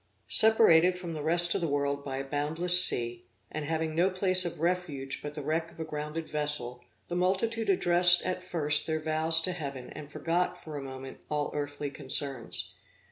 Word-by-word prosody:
Separated 185 -6 +5
from 175 -2 -9
the 155 - -8
rest 170 +2 +2
of - - -4
the 165 - -3
world 140 -1 -4
by 135 -2 -7
a 135 - -6
boundless 160 +6 +4
sea, 120 -3 +2 0.2
and 150 -1 -7
having 160 0 -5
no 175 +4 0
place 185 -1 +2
of 170 - -7
refuge 165 -6 -4
but 145 0 -10
the 150 - -8
wreck 160 +3 -4
of - - -22
a 160 - -6
grounded 150 +1 -8
vessel, 145 -5 -2 0.2
the 175 - -7
multitude 200 +5 -3
addressed 175 -1 +4
at 185 0 -5
first 150 -5 -2
their 160 -1 -4
vows 160 +1 +4
to 185 - -1
heaven, 140 -7 -9
and 150 -1 -13
forgot, 180 +2 -4
for 155 -3 -12
a 145 - -7
moment, 135 0 -11
all 150 -1 -4
earthly 145 -1 -7
concerns. 135 -2 -1
155 Hz, 190 wpm, -26 LUFS, 145-175 Hz, 0.2 s, Separated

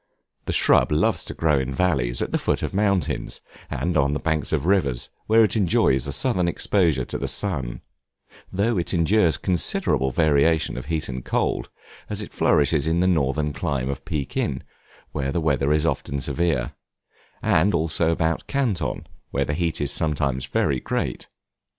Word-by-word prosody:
The - - -2
shrub - - +3
loves 75 - +1
to - - -6
grow 75 -4 +2
in 65 0 -3
valleys, 65 -10 +1
at - - -5
the - - 0
foot - - -1
of - - -3
mountains, 100 -2 0 0.3
and 90 0 -2
on 70 -1 +2
the 75 - -1
banks 80 -2 -1
of - - 0
rivers 75 -11 +1 0.2
where 110 +1 +6
it 110 - +1
enjoys 75 - +2
a - - -2
southern 90 - +1
exposure 85 -7 +1
to - - -4
the - - -2
sun; 70 -12 -2 0.7
though 100 +2 +1
it 85 - -1
endures 85 0 +3
considerable 85 -6 +1
variation 80 +3 +2
of 65 - -6
heat 80 -1 -2
and 65 -1 -5
cold, - - -1 0.4
as - - -3
it - - -11
flourishes 75 +1 +2
in 80 +1 +1
the 90 - +2
northern 75 -4 +1
clime 70 0 -2
of 70 - -7
Pekin, 70 -5 -2 0.5
where 70 -2 -2
the 85 - 0
winter 70 -3 +1
is 75 +1 +2
often 70 -3 -1
severe; 70 -3 -1 0.7
and 90 +4 +3
also 80 0 +1
about 80 0 0
Canton, 130 -9 -1 0.2
where 70 0 0
the 75 - -2
heat 85 +1 -1
is 70 - -1
sometimes 70 -4 -1
very 65 -3 0
great. - - -3
80 Hz, 170 wpm, -23 LUFS, 70-85 Hz, 0.7 s, where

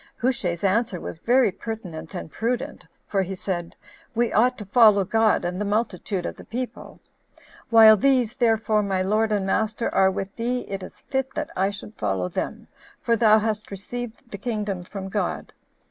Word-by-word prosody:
Hushai's 200 -9 -1
answer 200 -1 +1
was 165 - -7
very 245 +1 +3
pertinent 180 -7 -7
and 170 -3 -6
prudent; 250 - -3 0.2
for 195 - +1
he 190 +1 -3
said, 175 -2 -4 0.4
"We 235 0 +1
ought 250 +3 +3
to 210 - -7
follow 210 -2 +5
God 220 -1 +2
and 180 +3 -2
the - - +1
multitude 205 -3 -1
of - - -5
the - - -11
people; 250 +2 -6 0.7
while 220 -1 +9
these, 250 0 +2
therefore, 225 -3 +2
my 190 -2 0
lord 215 +3 +1
and 205 -2 +1
master, 220 +3 0
are 190 0 +5
with 195 +1 -4
thee, 245 +2 -1
it 195 -1 -4
is - - -11
fit 265 -1 -2
that 305 -1 -3
I 190 +1 +2
should 205 +1 -9
follow 95 -3 -1
them, - - -4 0.3
for 230 - +1
thou 220 -1 +5
hast 215 -1 -2
received 235 +4 -7
the 200 - -6
kingdom 210 -4 -3
from 195 +1 -7
God. 205 +1 -3
210 Hz, 175 wpm, -24 LUFS, 190-235 Hz, 0.7 s, while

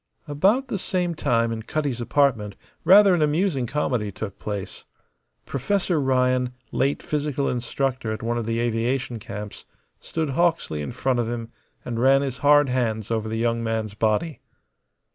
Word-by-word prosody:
About 195 - +2
the 200 - -3
same 180 -2 -1
time 115 -7 +1
in 115 -1 -3
Cutty's 140 0 -2
apartment 115 -6 +1 0.3
rather 195 +1 +7
an 175 - +2
amusing 150 -3 +1
comedy 125 -6 -1
took 100 0 -7
place. 100 -2 -5 0.6
Professor 175 +5 0
Ryan, 125 -1 +1 0.2
late 140 +2 0
physical 145 -2 -1
instructor 125 -1 -2
at 110 - -5
one 120 +1 -1
of 115 -2 -3
the 115 0 0
aviation 120 +1 -1
camps, 105 0 -8 0.3
stood 160 -3 -3
Hawksley 165 - +1
in 75 - -4
front 130 -2 0
of 115 -1 -1
him 115 -1 -5 0.3
and 115 -2 -3
ran 135 +2 +5
his 135 -2 -4
hard 145 0 +5
hands 115 -4 -1
over 110 -1 -1
the 110 - -2
young 115 0 0
man's 110 -2 -2
body. 110 +9 0
125 Hz, 160 wpm, -24 LUFS, 115-145 Hz, 0.6 s, rather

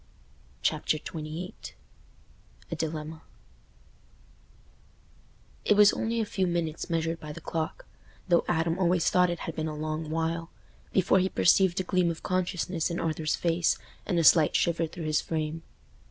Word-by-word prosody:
Chapter 155 - +1
XXVIII 155 +4 -6 1.2
A - - -1
Dilemma 160 0 -4 2.4
It 210 - +4
was 210 0 +7
only 230 +1 -1
a 220 - +1
few 190 -2 -1
minutes 170 -1 -2
measured 165 0 -1
by 150 - -8
the 150 - -8
clock—though 170 - -3
Adam 165 0 0
always 175 -2 +2
thought 180 0 +4
it 175 -1 -3
had 165 - -5
been 160 0 -2
a 155 - -4
long 155 +1 -3
while—before 165 +3 -1
he 190 +1 +1
perceived 190 0 +3
a - - 0
gleam 180 -1 +1
of 165 -1 -5
consciousness 180 -2 -1
in 170 - -3
Arthur's 155 -1 -1
face 170 0 +1 0.3
and 180 - 0
a 165 - +3
slight 155 -1 +6
shiver 165 -1 +1
through 165 0 -7
his 155 -1 +1
frame. 160 0 -3
165 Hz, 145 wpm, -28 LUFS, 160-180 Hz, 2.4 s, was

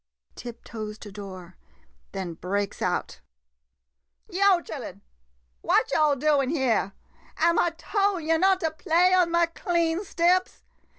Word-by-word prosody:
[Tiptoes 220 -3 -8
to 210 -1 -11
door, 190 -3 -10 0.5
then 185 -3 -5
breaks 195 +4 -3
out.] - - -2 1.1
Yo' 390 0 +4
chillen 255 - -8 0.3
— - - -44
what - - +2
yo' 300 -2 +3
doin' 280 -1 +1
dere? 250 -10 0 0.4
Am' 335 +1 +3
I 345 - +3
tol' 400 -1 0
yo' 325 0 +1
not 380 +2 +3
to 320 -2 0
play 350 +3 +2
on 360 -2 +4
ma 340 0 +3
clean 340 0 0
steps? 365 0 +1
310 Hz, 130 wpm, -26 LUFS, 210-350 Hz, 1.1 s, Yo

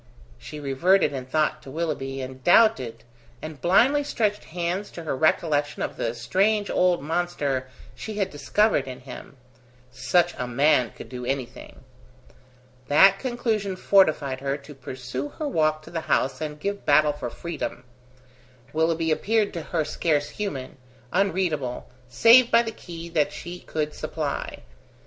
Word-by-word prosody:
She 150 - -9
reverted 150 +4 +2
in 130 -2 -5
thought 155 +2 0
to - - -12
Willoughby, 135 -3 -3
and 130 0 -8
doubted, 135 - +4 0.4
and 155 -2 -8
blindly 255 - +4
stretched 210 -7 -1
hands 175 +4 -3
to 170 - -9
her 155 - -2
recollection 150 0 +1
of - - -4
the 115 0 -2
strange 200 - +1
old 180 -5 +2
monster 145 -5 -1 0.3
she 215 - -7
had 195 -2 -1
discovered 210 +5 +1
in 130 0 -8
him. 130 +1 -11 0.5
Such 170 +8 +1
a 125 - -2
man 125 -1 +3
could - - -11
do 125 -1 -7
anything. 130 0 -5 1.0
That 195 +7 +6
conclusion 225 -6 -1
fortified 155 -9 +3
her 135 +1 -2
to 145 +1 -13
pursue 130 +1 -6
her 305 - -2
walk 155 - +1
to - - -13
the 165 -1 -3
house 130 +1 +1
and 150 -1 -5
give 200 +5 -3
battle 150 +1 +4
for 145 -4 -5
freedom. 160 -4 -5 0.9
Willoughby 160 0 +1
appeared 215 +6 +1
to 170 - -4
her 160 0 -2
scarce 145 -3 0
human, 145 -14 -5 0.4
unreadable, 180 -9 0 0.2
save 230 - +6
by 235 - +5
the 225 - -4
key 170 -5 -9
that 155 -3 +1
she 175 +1 -8
could 150 -1 -3
supply. - - -4
155 Hz, 150 wpm, -25 LUFS, 135-190 Hz, 1.0 s, That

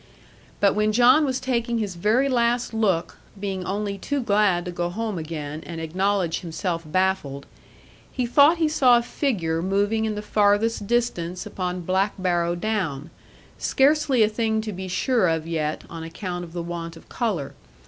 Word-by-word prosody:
But 200 -1 +4
when 210 0 +1
John 250 +6 +6
was 260 -2 -1
taking 235 -2 -1
his 210 -4 -2
very 215 +10 +2
last 240 -2 +1
look, 200 -7 0 0.2
being 190 -2 -3
only 200 +1 -3
too 285 +8 -2
glad 205 -6 +2
to 180 - -4
go 175 0 -2
home 215 0 -3
again, 155 -1 -5
and 165 -1 -7
acknowledge 185 +2 0
himself 165 0 -3
baffled, 155 -5 -1 0.7
he 255 - -1
thought 285 +7 +5
he 325 -1 +2
saw 265 -6 +5
a 235 - 0
figure 175 - -1
moving 205 +4 +1
in 215 -1 -2
the 210 - -5
farthest 210 +1 +2
distance 185 -7 -1
upon 180 -1 -3
Black 190 +4 0
Barrow 175 -2 0
Down, 175 -7 -2 0.5
scarcely 275 -3 +3
a - - +4
thing 220 0 0
to 215 -1 -5
be 190 +1 -6
sure 205 +3 +1
of 160 -1 0
yet, 155 -2 -2
on 165 -1 -8
account 175 +2 -5
of 165 - -14
the 175 -1 -4
want 170 -1 -6
of - - -16
colour. 195 - -2
195 Hz, 170 wpm, -24 LUFS, 170-230 Hz, 0.7 s, John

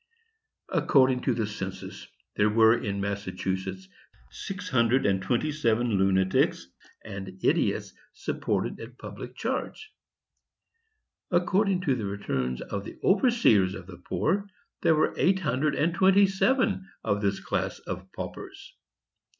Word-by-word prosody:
"According 130 -2 +3
to - - +2
the 110 - 0
census, 95 -2 -7 0.3
there 105 +1 +3
were 110 +1 +6
in 100 -3 -3
Massachusetts 95 -1 -3 0.4
six 205 +1 -6
hundred 120 +1 +3
and 95 -1 +2
twenty 125 +10 0
seven 120 -5 +1
lunatics 95 -2 +2 0.4
and 95 -3 -7
idiots - - +1 0.2
supported - - -2
at 120 +2 -10
public - - -9
charge; 435 - -4 1.4
according 185 +2 +2
to 145 -7 +1
the 115 -5 -3
returns 65 -11 -2
of 100 -1 -4
the - - -9
overseers 190 - +4
of 95 - -9
the 90 -1 -11
poor, 195 - -1 0.3
there 160 - +4
were 155 - +2
eight 190 +1 +3
hundred 150 -2 0
and 165 +2 +1
twenty 190 +3 +5
seven 195 0 +1
of 100 0 0
this 100 -1 0
class - - -2
of 95 +1 -7
paupers. - - -8
115 Hz, 130 wpm, -27 LUFS, -, 1.4 s, were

